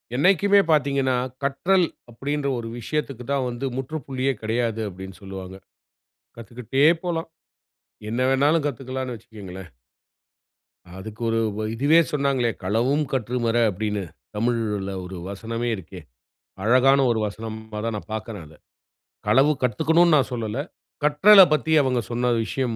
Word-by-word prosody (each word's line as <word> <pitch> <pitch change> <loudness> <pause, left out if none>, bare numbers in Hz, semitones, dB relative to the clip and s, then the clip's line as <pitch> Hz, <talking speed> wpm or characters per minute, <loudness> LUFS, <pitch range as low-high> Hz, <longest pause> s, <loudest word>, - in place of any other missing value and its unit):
என்னைக்குமே 195 +6 +4
பாத்தீங்கன்னா, 140 -3 +2 0.3
கற்றல் 175 +7 +2 0.3
அப்டீன்ற 140 +4 -3
ஒரு 115 - -6
விஷயத்துக்கு 140 0 -3
தான் 140 -2 +1
வந்து 120 +2 -4
முற்றுப்புள்ளியே 135 -1 -2
கெடையாது 115 0 -1
அப்டீன்னு 95 -1 -10
சொல்லுவாங்க. 95 -1 -8 0.8
கத்துக்குட்டே 120 +4 -1 0.2
போலாம். 165 -2 -2 0.8
என்ன 120 +3 -1
வேணாலும் 145 +4 +3
கத்துக்கலாம்னு 130 -1 -4
வச்சுக்கோங்களேன். 95 -5 -10 1.3
அதுக்கு 105 +4 -9
ஒரு 115 0 +1 0.4
இதுவே 145 +7 +4
சொன்னாங்களே, 135 -5 +1
"களவும் 120 +10 +1
கற்று 125 -1 -1
மற" 115 +1 +1
அப்டீன்னு, 105 +1 -3 0.3
தமிழ்ல 105 -3 -1
ஒரு 95 +1 -8
வசனமே 115 +4 -4
இருக்கே. 95 -1 -10 0.6
அழகான 130 +5 +5
ஒரு 115 - 0
வசனமா 110 +1 -7
தான் 115 -1 -2
நான் 105 - -10
பாக்குறேன் 110 -5 -6
அத. 80 - -17 0.7
களவு 135 +8 +5
கத்துக்கணும்னு 160 +7 +3
நான் 135 -1 0
சொல்லல. 115 0 -3 0.4
கற்றலை 190 +8 +8
பத்தி 155 +1 0
அவங்க 130 -3 +1
சொன்ன 120 +1 +1
விஷயம் 120 0 -2
120 Hz, 120 wpm, -23 LUFS, 110-140 Hz, 1.3 s, கற்றலை